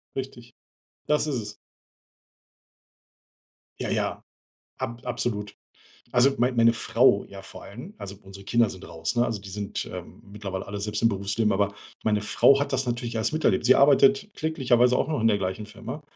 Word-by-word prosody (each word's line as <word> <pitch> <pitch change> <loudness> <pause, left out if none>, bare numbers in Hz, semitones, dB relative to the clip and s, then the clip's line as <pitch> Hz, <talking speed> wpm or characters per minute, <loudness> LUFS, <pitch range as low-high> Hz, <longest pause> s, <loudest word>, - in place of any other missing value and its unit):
Richtig, 125 -3 -7 0.5
das 150 0 +2
ist 145 - -1
es. 105 -3 -5 2.2
Ja, - - -3
ja, - - -1 0.6
ab 120 +1 -4
absolut. 110 -4 -3 0.6
Also 125 +3 +5
mein 125 +1 +1
meine 115 0 +6
Frau, 115 -2 +3
ja, 100 -1 -10
vor 95 - -10
allem. 125 - -10
Also, 100 0 -7
unsere 95 0 -12
Kinder 115 +2 +3
sind 95 -1 -10
raus, 80 0 -3
ne? 120 0 +3
Also, 110 -4 -3
die 100 - -11
sind, 100 +1 -4
ähm, - - -9
mittlerweile 100 -2 -5
alle 100 0 -5
selbst 105 0 -3
im 115 - +6
Berufsleben. 100 +1 0
Aber 100 +1 +1 0.3
meine 105 -1 +1
Frau 135 +6 +4
hat 145 - -2
das - - 0
natürlich 120 -1 -3
alles 110 0 0
miterlebt. 155 -11 +1
Sie 130 +2 +6
arbeitet 205 +10 +5
kläglicherweise 125 -6 +2
auch - - +1
noch 155 -5 -1
in 115 - +4
der 105 -2 +2
gleichen 95 +2 -3
Firma. 130 +7 -8
115 Hz, 175 wpm, -26 LUFS, 100-125 Hz, 2.2 s, meine